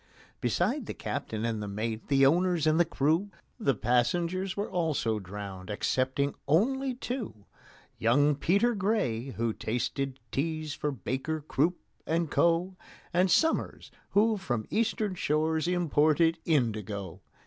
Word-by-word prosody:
Besides -, -, 0 dB
the -, -, -5 dB
captain 110 Hz, +1 st, -4 dB
and 115 Hz, -2 st, -1 dB
the 105 Hz, -, -4 dB
mate, 110 Hz, +2 st, -4 dB
the 135 Hz, -1 st, +4 dB
owners 175 Hz, +2 st, +3 dB
and 155 Hz, +1 st, +3 dB
the 175 Hz, -, +5 dB
crew, 160 Hz, +5 st, +1 dB, 0.3 s
The 135 Hz, -, +2 dB
passengers 170 Hz, -, 0 dB
were 205 Hz, -, -1 dB
also 150 Hz, -11 st, 0 dB
drowned 95 Hz, -1 st, -8 dB
excepting 130 Hz, +6 st, 0 dB
only 255 Hz, -, +2 dB
two: 240 Hz, -, -5 dB, 0.5 s
Young 145 Hz, +6 st, +4 dB
PETER 200 Hz, -, +2 dB
GRAY, 200 Hz, -, 0 dB
who 115 Hz, -1 st, 0 dB
tasted 130 Hz, +5 st, -2 dB
teas 155 Hz, +1 st, -2 dB
for 150 Hz, 0 st, -2 dB
BAKER, 135 Hz, -, -3 dB
CROOP, 155 Hz, +4 st, 0 dB, 0.3 s
AND 165 Hz, -1 st, 0 dB
CO., 170 Hz, +2 st, +2 dB, 0.4 s
And 180 Hz, +2 st, +3 dB
SOMERS, 325 Hz, -, +1 dB, 0.2 s
who 215 Hz, +2 st, +3 dB
from 120 Hz, -, -2 dB
Eastern 215 Hz, -2 st, 0 dB
shores 160 Hz, -1 st, 0 dB
imported 165 Hz, -1 st, +3 dB
indigo. 105 Hz, -, -1 dB
155 Hz, 130 wpm, -29 LUFS, 120-180 Hz, 0.5 s, the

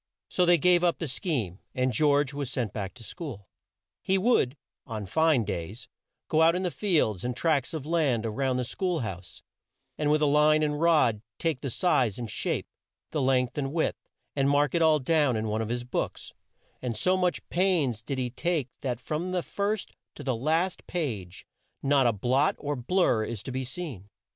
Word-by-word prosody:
So 180 Hz, -1 st, +2 dB
they 175 Hz, 0 st, +6 dB
gave 175 Hz, +2 st, +4 dB
up 175 Hz, -1 st, +3 dB
the 165 Hz, -, -3 dB
scheme, 125 Hz, -, -2 dB, 0.2 s
and 130 Hz, 0 st, +1 dB
George 145 Hz, +1 st, +3 dB
was 140 Hz, -3 st, -3 dB
sent 125 Hz, -5 st, -2 dB
back 100 Hz, -3 st, -5 dB
to 120 Hz, -, -12 dB
school. 125 Hz, -, -7 dB, 0.6 s
He 190 Hz, -, +2 dB
would, 185 Hz, -, +2 dB, 0.3 s
on 110 Hz, -3 st, -4 dB
fine 160 Hz, -, +3 dB
days, 100 Hz, +3 st, -5 dB, 0.4 s
go 155 Hz, -, +2 dB
out 165 Hz, +1 st, +5 dB
in 185 Hz, -, -1 dB
the 180 Hz, -, 0 dB
fields 155 Hz, -, +1 dB
and 125 Hz, 0 st, -3 dB
tracts 150 Hz, -6 st, +1 dB
of 155 Hz, -4 st, -5 dB
land 150 Hz, -9 st, +1 dB
a 110 Hz, -, -1 dB
round 130 Hz, +2 st, 0 dB
the 125 Hz, -, 0 dB
school 175 Hz, +6 st, -2 dB
house, 90 Hz, -6 st, -7 dB, 0.6 s
and 150 Hz, -1 st, +1 dB
with 150 Hz, 0 st, +3 dB
line 150 Hz, +1 st, +4 dB
and 150 Hz, 0 st, -1 dB
rod 155 Hz, -11 st, +4 dB, 0.2 s
take 160 Hz, -6 st, -1 dB
the 135 Hz, -, -3 dB
size 125 Hz, -, +1 dB
and 120 Hz, -3 st, -5 dB
shape, -, -, -2 dB, 0.5 s
the 150 Hz, -, -1 dB
length 130 Hz, 0 st, +1 dB
and 135 Hz, -1 st, -2 dB
width, 160 Hz, +1 st, -2 dB, 0.3 s
and 135 Hz, -1 st, +2 dB
mark 145 Hz, -1 st, +3 dB
it 170 Hz, -, +2 dB
all 160 Hz, -1 st, +5 dB
down 145 Hz, -2 st, +2 dB
in 110 Hz, 0 st, -1 dB
one 110 Hz, +1 st, -1 dB
of 110 Hz, -, -3 dB
his 120 Hz, +1 st, -2 dB
books, 125 Hz, -, -4 dB, 0.5 s
and 120 Hz, -3 st, -3 dB
so 185 Hz, 0 st, +2 dB
much 180 Hz, -1 st, 0 dB
pains 165 Hz, -, +1 dB
did 135 Hz, +4 st, -4 dB
he 125 Hz, -2 st, -2 dB
take 155 Hz, -1 st, -1 dB
that 125 Hz, -4 st, -2 dB
from 165 Hz, +7 st, -3 dB
the 180 Hz, -2 st, 0 dB
first 205 Hz, +1 st, -2 dB, 0.2 s
to 145 Hz, -, -8 dB
the 130 Hz, -3 st, 0 dB
last 160 Hz, +9 st, 0 dB
page 105 Hz, -, -4 dB, 0.4 s
not 135 Hz, -2 st, +4 dB
a -, -, +4 dB
blot 125 Hz, +7 st, +2 dB
or 145 Hz, 0 st, -3 dB
blur 125 Hz, -, +2 dB
is 110 Hz, -1 st, -5 dB
to 130 Hz, -, -5 dB
be 130 Hz, +1 st, -2 dB
seen. 130 Hz, -, -7 dB
140 Hz, 195 wpm, -28 LUFS, 120-165 Hz, 0.6 s, they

